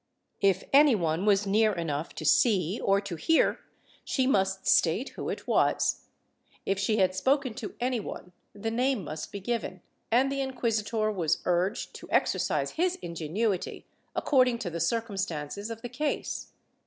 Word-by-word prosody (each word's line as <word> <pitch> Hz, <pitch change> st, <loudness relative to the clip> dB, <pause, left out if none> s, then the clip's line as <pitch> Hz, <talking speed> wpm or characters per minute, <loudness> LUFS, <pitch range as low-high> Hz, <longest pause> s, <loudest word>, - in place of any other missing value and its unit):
If 195 Hz, -2 st, +3 dB
any 285 Hz, -2 st, +7 dB
one 170 Hz, -1 st, -1 dB
was 205 Hz, 0 st, +4 dB
near 215 Hz, +2 st, +3 dB
enough 165 Hz, -3 st, -3 dB
to 155 Hz, -, -6 dB
see 180 Hz, +5 st, +3 dB
or 195 Hz, 0 st, +3 dB
to 200 Hz, -4 st, -5 dB
hear, 325 Hz, -, +2 dB, 0.4 s
she 260 Hz, -, 0 dB
must 195 Hz, -6 st, +1 dB
state 180 Hz, +11 st, +3 dB
who -, -, -6 dB
it -, -, -5 dB
was; -, -, +1 dB, 0.6 s
if 195 Hz, 0 st, 0 dB
she 215 Hz, +2 st, +1 dB
had 185 Hz, -2 st, +3 dB
spoken 265 Hz, +4 st, +1 dB
to 215 Hz, -, -6 dB
any 250 Hz, 0 st, 0 dB
one, 180 Hz, -3 st, -8 dB, 0.2 s
the 215 Hz, +2 st, -4 dB
name 250 Hz, -2 st, +1 dB
must 155 Hz, 0 st, -6 dB
be 200 Hz, -, -5 dB
given, 195 Hz, -3 st, -3 dB, 0.3 s
and 255 Hz, +4 st, +3 dB
the 275 Hz, 0 st, -1 dB
inquisitor 225 Hz, -4 st, -1 dB
was 170 Hz, -6 st, 0 dB
urged 180 Hz, +4 st, 0 dB
to -, -, -12 dB
exercise -, -, +1 dB
his 360 Hz, +2 st, 0 dB
ingenuity 175 Hz, +5 st, -2 dB, 0.3 s
according 255 Hz, -4 st, +3 dB
to 200 Hz, -7 st, -4 dB
the 170 Hz, -, -4 dB
circumstances 195 Hz, -2 st, -2 dB
of 225 Hz, +1 st, -7 dB
the -, -, -3 dB
case. 290 Hz, +5 st, -3 dB
205 Hz, 160 wpm, -28 LUFS, 180-240 Hz, 0.6 s, any